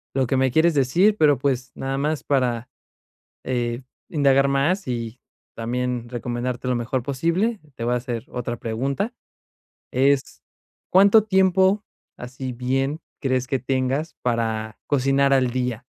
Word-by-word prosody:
lo 135 -1 +2
que 130 +2 0
me 130 -1 +2
quieres 160 +4 +4
decir, 170 +10 +3
pero 145 -4 +5
pues, 130 -2 -1
nada 135 0 -3
más 150 +1 -1
para, 125 -4 0 0.8
eh, 120 0 -2 0.3
indagar 140 -3 +3
más 155 +7 +1
y 115 -1 -4 0.4
también 120 +1 -2
recomendarte 120 +1 -3
lo 125 - +1
mejor 120 +1 -2
posible. 170 - 0
Te - - -5
voy 120 - +1
a - - +2
hacer 120 -1 -5
otra 120 -1 -4
pregunta 135 - -2 0.8
es, 135 +1 +1 0.5
¿cuánto 200 +3 +6
tiempo 190 0 +3 0.3
así, 125 +1 -6
bien, 135 +5 -1 0.2
crees 130 -2 0
que 135 0 0
tengas 130 +5 -1
para 110 -2 -1
cocinar 140 0 +3
al 130 -2 +3
día? 125 -2 -2
130 Hz, 140 wpm, -23 LUFS, 125-145 Hz, 0.8 s, cuánto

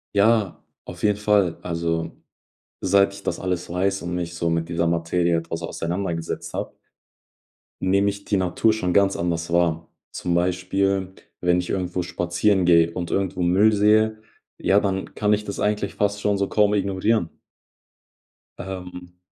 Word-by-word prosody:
Ja, 105 -1 +2 0.2
auf - - -10
jeden 105 -1 +3
Fall. 105 -5 +2
Also, 85 -1 -2 0.7
seit 100 +1 +3
ich 100 0 -11
das - - -2
alles 90 -2 -3
weiß 95 +3 0
und 85 0 -4
mich 85 -1 -3
so 85 0 -1
mit 85 0 -1
dieser 85 0 0
Materie 85 +1 +1
etwas 80 0 -4
auseinandergesetzt 85 0 -4
habe - - -5 1.0
nehme 100 +2 +2
ich 100 0 -7
die 100 - +1
Natur 95 +4 +2
schon 95 -5 -1
ganz 100 0 +3
anders 85 -1 -2
wahr. 85 -1 +1 0.2
Zum 90 - -2
Beispiel, 95 +2 0 0.3
wenn 90 0 +3
ich 90 - -4
irgendwo 90 -1 -2
spazieren 90 +2 +1
gehe 85 -1 +5
und 85 0 -5
irgendwo 95 -2 -1
Müll 95 +5 +4
sehe, 110 +1 +3 0.4
ja, 100 - +3
dann 95 -2 -2
kann 105 -1 0
ich 105 0 -1
das 100 - -5
eigentlich 105 -1 -1
fast 105 0 0
schon 105 -1 +1
so 100 - 0
kaum 105 -1 +3
ignorieren. 100 -1 +1 1.3
Ähm. 90 -1 -8
95 Hz, 155 wpm, -23 LUFS, 85-100 Hz, 1.3 s, gehe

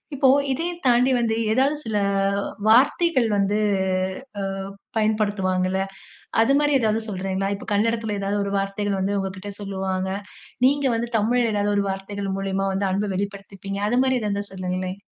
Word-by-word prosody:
இப்போ, 275 0 +3 0.2
இதயும் 340 +6 -2
தாண்டி 250 +1 +4
வந்து 230 -2 +1 0.2
ஏதாவது 265 +6 +3
சில 215 -2 -1 0.4
அ - - 0 0.3
வார்த்தைகள் 260 +3 +4
வந்து 200 +1 +1 0.8
அ, - - -2 0.6
பயன்படுத்துவாங்கல? 195 -4 +1 0.6
அது 225 - +3
மாரி 295 0 +2
ஏதாவது 220 -1 +1
சொல்றேங்களா? 190 0 -2
இப்போ 200 - -10
கன்னடத்தில 225 0 +1
ஏதாவது 200 +1 -1
ஒரு 200 - -3
வார்த்தைகள் 195 0 -1
வந்து 200 +2 0
உங்க 195 0 -2
கிட்ட 205 +2 -7
சொல்லுவாங்க. 190 -1 -2 0.6
நீங்க 280 +1 +3
வந்து 235 +1 -2
தமிழ்ல 230 +2 +2
ஏதாவது 205 0 +1
ஒரு 200 - +2
வார்த்தைகள் 195 0 -4
மூலியமா 195 0 -1
வந்து 195 0 0
அன்பை 200 +2 0
வெளிப்படுத்திப்பீங்க. 195 0 -5
அது 245 +3 +2
மாரி 260 -1 +2
ஏதாவது 210 - -1
இருந்தா 200 0 -2
சொல்லுங்களேன். 185 0 -3
205 Hz, 155 wpm, -23 LUFS, 195-230 Hz, 0.8 s, தாண்டி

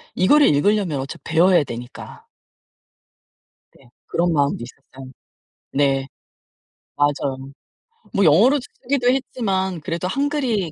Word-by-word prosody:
이거를 290 +11 +4
읽으려면 180 -1 +1
어차피 135 +1 -7
배워야 170 +1 +3
되니까. 120 -1 -10 1.5
네. 130 - -22 0.2
그런 175 0 0
마음도 140 -5 0
있었어요. 130 +1 -13 0.6
네. 135 -1 +1 0.9
맞아요. 145 -2 0 0.8
뭐 200 - +2
영어로 220 - +5 0.2
쓰기도 250 -1 0
했지만 190 - -2
그래도 170 +3 -3
한글이 260 - -1
170 Hz, 260 characters per minute, -21 LUFS, 140-215 Hz, 1.5 s, 영어로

